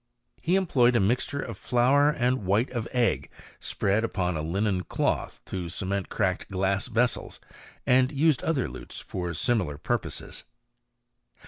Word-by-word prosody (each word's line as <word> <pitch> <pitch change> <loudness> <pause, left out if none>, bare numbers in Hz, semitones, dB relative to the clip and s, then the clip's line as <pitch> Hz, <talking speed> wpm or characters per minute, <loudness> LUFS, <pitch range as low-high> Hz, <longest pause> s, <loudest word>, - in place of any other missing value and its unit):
He 175 +3 +2
employed 130 -10 +3
a - - +5
mixture 125 +7 0
of 115 -5 -7
flour 135 +4 +4
and 125 -4 0
white 105 +7 +1
of 120 -3 -3
egg 125 -2 +1 0.3
spread 100 +3 0
upon 90 -6 -1
a 75 - -2
linen 95 +3 0
cloth - - -1
to 90 -3 -4
cement 95 +1 -3
cracked 95 -4 -1
glass 95 +2 0
vessels, 120 0 0 0.5
and 130 +1 +4
used 150 -1 +2
other 145 -6 0
lutes - - -8
for 90 -2 -4
similar 95 - 0
pur 120 +10 0
poses. - - -7
115 Hz, 145 wpm, -27 LUFS, 95-125 Hz, 0.5 s, a